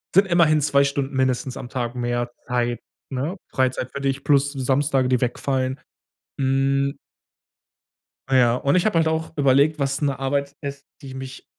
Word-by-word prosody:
sind 195 +1 +6
immerhin 165 -4 +4
2 140 -1 +3
Stunden 140 0 -2
mindestens 130 0 0
am - - -7
Tag 120 -2 -3
mehr 120 0 -2 0.2
Zeit, 120 -1 0 0.3
ne? 140 +9 -3
Freizeit 130 -1 0
für 140 - -6
dich 135 0 -1
plus 140 0 +3
die 135 - -5
Samstage, 135 0 +1
die 125 -2 +2
wegfallen. 130 +1 -1 0.6
Hm. 135 +1 +1 1.3
Na 135 -1 +3
ja, 120 -2 +4
und 140 +4 +1
ich 180 - +2
habe 215 -6 +2
halt 165 -1 +3
auch 160 0 -1
überlegt, 140 +2 +3
was 140 +1 -1
'ne 140 -3 0
Arbeit 140 +1 -1
ist, 140 0 -6 0.2
die 135 -2 -9
mich 130 0 -8
135 Hz, 170 wpm, -23 LUFS, 130-140 Hz, 1.3 s, sind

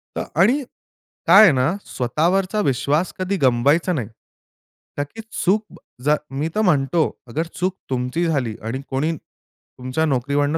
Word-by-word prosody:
अ, - - -1 0.2
आणि 255 +9 +3 0.6
काय 215 - +9
आहे 200 - +8
ना, 130 +3 +2
स्वतःवरचा 180 - 0
विश्वास 140 +5 0
कधी 185 +1 -1
गमवायचा 140 +8 +3
नाही. 125 -10 -2 0.9
का 145 - 0
की 225 +11 -10
चूक 210 +4 +1 0.4
जर 150 +2 +4 0.2
मी 155 - 0
तर 215 - +2
म्हणतो 155 - +2 0.3
अगर 160 +8 -3
चूक 185 +1 -1
तुमची 130 +6 -1
झाली 135 -9 -1
आणि 115 +5 -4
कोणी 140 +5 0
तुमच्या 130 +2 -6
नोकरीवरून 145 +2 0
150 Hz, 140 wpm, -21 LUFS, 130-180 Hz, 0.9 s, काय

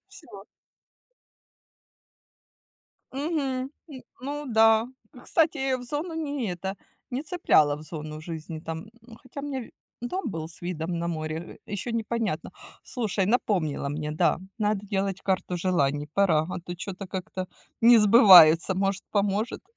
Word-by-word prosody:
Всё. 320 - -13 2.7
Мгм, 300 +4 -2 0.5
м, 260 -3 -9 0.2
ну 290 +2 -4
да. 225 0 +4 0.3
Ы 250 - -13
кстати, 320 +2 +1
я 265 -1 0
в 245 - -9
зону 300 +7 -4
не 285 - -3
это, 190 +3 -5 0.3
не 265 +4 -3
цепляла 155 - +3
в 150 - -10
зону 155 -1 -7
жизни 160 -1 -7
там. 160 -1 -5
М, 210 - -12
ну 230 -1 -14
хотя 255 +3 -8
мне 275 -2 -4
ви 230 - -11 0.3
дом 290 +3 -3
был 160 -4 -5
с 165 - -17
видом 175 -1 -3
на 170 - -2
море, 155 -2 -3 0.3
э, - - -12
ещё 205 +4 -3
непонятно. 225 -6 -2 0.3
Слушай, 215 -6 -1
напомнила 185 - 0
мне. 150 +1 -3
Да, 155 - +2 0.2
надо 210 -1 0
делать 195 -1 -2
карту 185 -2 -1
желаний. 145 -5 0
Пора, 170 -6 +3
а, 180 - -4
то 175 +1 -7
чё-то 190 +2 -6
как-то 185 0 -5 0.3
не 235 +1 +8
сбывается. 190 -6 +8
Может, 195 0 -1
поможет. 205 +2 0
195 Hz, 150 wpm, -26 LUFS, 170-245 Hz, 2.7 s, не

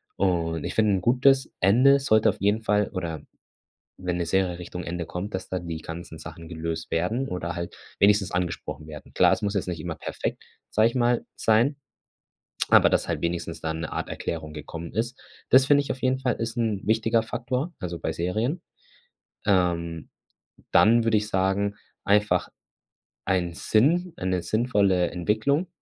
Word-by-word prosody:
Und, 85 -4 0
ich - - -4
finde 110 -2 +3
'n 95 - 0
gutes 130 +5 +3
Ende 130 +9 +5
sollte 110 -5 +3
auf - - -3
jeden 105 +3 +2
Fall 105 -1 +1
oder 85 -5 -4 0.8
wenn 90 -1 -2
'ne 85 - -1
Serie 90 0 0
Richtung 90 +1 -6
Ende 85 0 -4
kommt, 95 +6 -5
dass 95 - -4
da 95 - -1
die 85 -1 -5
ganzen 80 0 -8
Sachen 85 +1 -10
gelöst 80 -1 -4
werden 110 +11 0
oder 85 -1 -4
halt 85 0 -6 0.2
wenigstens 100 -1 +4
angesprochen 85 -3 -3
werden. 75 -1 -11
Klar, - - +5
es - - +1
muss 100 -1 -1
jetzt 100 -3 -1
nicht 85 - -4
immer 80 0 -4
perfekt, - - -4 0.3
sage 110 +2 +3
ich 115 - -10
mal, 120 -1 +2
sein, 115 +6 +3 0.9
aber - - +7
dass - - +1
halt - - -2
wenigstens 85 -1 -3
dann 80 0 -3
'ne 80 - -5
Art - - -3
Erklärung 80 -2 -4
gekommen 80 +2 -7
ist. 120 +4 -3 0.3
Das, 130 0 +6
finde 145 0 +5
ich, - - -3
auf 130 - -6
jeden 130 0 +2
Fall 125 -3 0
ist 115 +1 -4
'n 110 -4 0
wichtiger 110 +1 +2
Faktor, 125 +8 -3
also, 85 -2 -5
bei 80 - -2
Serien. 110 - -1 0.9
Ähm, 85 -4 0 0.6
dann 115 +2 +5
würde 110 -2 +3
ich 105 - -4
sagen, 100 +1 0 0.3
einfach 105 +1 +2 0.8
ein 90 -3 0
Sinn, 165 - +2
eine 90 -1 -1
sinnvolle 100 -6 +2
Entwicklung. 110 - 0
95 Hz, 170 wpm, -25 LUFS, 85-115 Hz, 0.9 s, aber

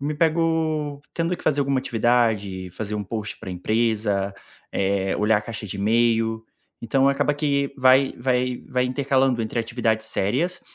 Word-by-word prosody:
me 145 +2 -2
pego 160 -2 0
tendo 170 +1 -1
que - - -13
fazer 145 -1 +2
alguma 140 -1 +1
atividade, 110 -6 0
fazer 105 +3 -4
um 105 - -3
post 105 +1 -5
para - - -7
empresa, 105 0 0 0.4
eh, 95 0 0
olhar 105 +1 +3
a - - -8
caixa 115 0 -6
de 100 - -6
e-mail, 115 +1 +1 0.4
então 135 +4 +2
acaba 140 +1 +2
que 140 -2 0
vai 130 +1 +5
vai 125 0 0
vai 125 -1 +1
intercalando 130 -2 +1
entre 110 +2 -3
atividades 110 -1 -1
sérias 130 - -1
120 Hz, 155 wpm, -23 LUFS, 105-140 Hz, 0.4 s, vai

